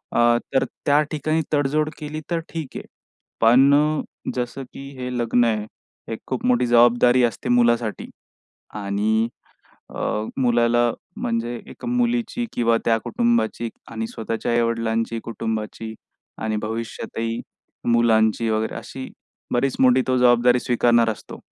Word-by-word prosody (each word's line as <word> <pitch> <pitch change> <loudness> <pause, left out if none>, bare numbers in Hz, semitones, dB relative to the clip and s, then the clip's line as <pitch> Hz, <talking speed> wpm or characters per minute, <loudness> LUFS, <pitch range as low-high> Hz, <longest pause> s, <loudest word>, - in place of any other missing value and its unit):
अ, 120 0 +5 0.2
तर 135 - +3 0.2
त्या 145 0 +4
ठिकाणी 155 +1 0
तडजोड 150 +1 +1
केली 155 +1 -5
तर 170 - +1
ठीक 160 -5 -6
आहे. - - -6 0.6
पण 140 +6 +5 0.3
जसं 125 +2 -3
की 135 0 -8
हे 125 0 -4
लग्न 120 0 +2
आहे, 110 -2 0 0.5
एक 110 - -6
खूप 130 - -3
मोठी 125 0 +3
जबाबदारी 120 +1 +5
असते 120 0 -1
मुलासाठी. 120 -2 +2 0.7
आणि 105 +2 0 0.7
अ, - - -7 0.4
मुलाला 120 -1 +3 0.3
म्हणजे 115 +1 -2 0.2
एक - - -12
मुलीची 240 -1 0
किंवा 115 -1 +3
त्या 115 - +4
कुटुंबाची 235 - 0 0.2
आणि 115 0 -3
स्वतःच्या 115 +1 -3
आई-वडिलांची, 115 -1 0
कुटुंबाची 110 -1 -4 0.5
आणि 110 -1 -1
भविष्यातही 115 +1 -4 0.5
मुलांची 115 -1 +3
वगैरे, 110 0 -1
अशी 130 0 -7 0.4
बरीच 130 +2 +1
मोठी 130 0 +5
तो 130 - +3
जबाबदारी 125 0 +4
स्वीकारणार 120 -1 +3
असतो. 110 - -8
120 Hz, 125 wpm, -22 LUFS, 115-130 Hz, 0.7 s, अ